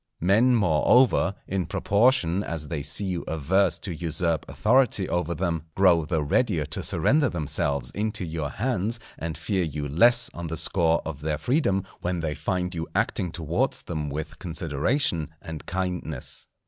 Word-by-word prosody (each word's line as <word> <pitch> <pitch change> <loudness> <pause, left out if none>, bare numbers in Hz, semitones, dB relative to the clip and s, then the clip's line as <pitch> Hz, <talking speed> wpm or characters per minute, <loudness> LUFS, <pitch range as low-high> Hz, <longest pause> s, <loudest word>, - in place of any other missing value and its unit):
Men, 110 +8 +4
moreover, 100 +3 +3
in 95 -2 -2
proportion 100 -4 +2
as 80 -5 -5
they 75 -4 -2
see 75 +8 0
you 90 -3 -2
averse 90 +5 +2
to 95 - -5
usurp 85 -1 -1
authority 115 -4 +3
over 85 -1 -1
them, 85 -3 -2
grow 90 -5 +4
the 80 -1 0
readier 85 - +1
to 75 - -4
surrender 130 - +2
themselves 70 - -1
into 105 -2 -2
your 80 -3 -3
hands; 115 - -2 0.2
and 80 -1 -4
fear 95 -4 -1
you 75 -2 -3
less 120 - +4
on 85 0 -5
the 80 0 -4
score 80 +2 +2
of 75 -3 -6
their 75 0 -1
freedom, 100 - +1 0.2
when 90 -1 -2
they 80 -2 -2
find 90 +2 -2
you 80 -1 -4
acting 90 - 0
towards 85 0 -1
them 75 -3 -4
with 75 +2 -6
consideration 80 - 0
and 80 -1 -8
kindness. 90 -6 -4
85 Hz, 160 wpm, -25 LUFS, 80-100 Hz, 0.2 s, Men